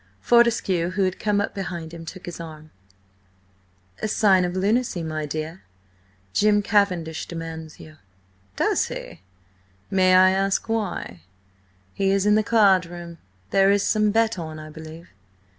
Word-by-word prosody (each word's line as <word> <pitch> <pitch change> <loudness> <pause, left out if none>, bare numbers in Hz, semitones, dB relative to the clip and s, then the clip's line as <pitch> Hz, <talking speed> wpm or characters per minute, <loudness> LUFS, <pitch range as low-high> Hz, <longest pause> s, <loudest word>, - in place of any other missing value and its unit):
Fortescue, 230 -8 +2
who 190 +2 -1
had 185 0 -1
come 210 -1 +1
up 200 - -2
behind 170 -4 -6
him, 165 -1 -9
took 185 +3 -9
his 175 -1 -7
arm. 155 -2 -10 1.3
"A - - -1
sign 200 -3 +3
of 175 +1 -4
lunacy, 200 -1 0
my 155 -1 -4
dear. 155 +4 -5 0.7
Jim 205 - +3
Cavendish 180 -7 0
demands 160 -2 -7
you." 155 0 -13 0.6
"Does - - +1
he? - - -8 0.7
May 185 -1 +4
I 185 0 +6
ask 195 +2 0
why?" 205 - -3 0.7
"He 195 -1 0
is 195 0 +2
in 210 - +4
the 215 - +4
card 200 -5 +4
room. 170 -1 -9 0.3
There 195 0 +4
is 200 0 +3
some 215 -1 +2
bet 225 -1 +1
on, 160 -2 -6
I 155 0 -9
believe." 160 +2 -11
185 Hz, 150 wpm, -23 LUFS, 165-205 Hz, 1.3 s, I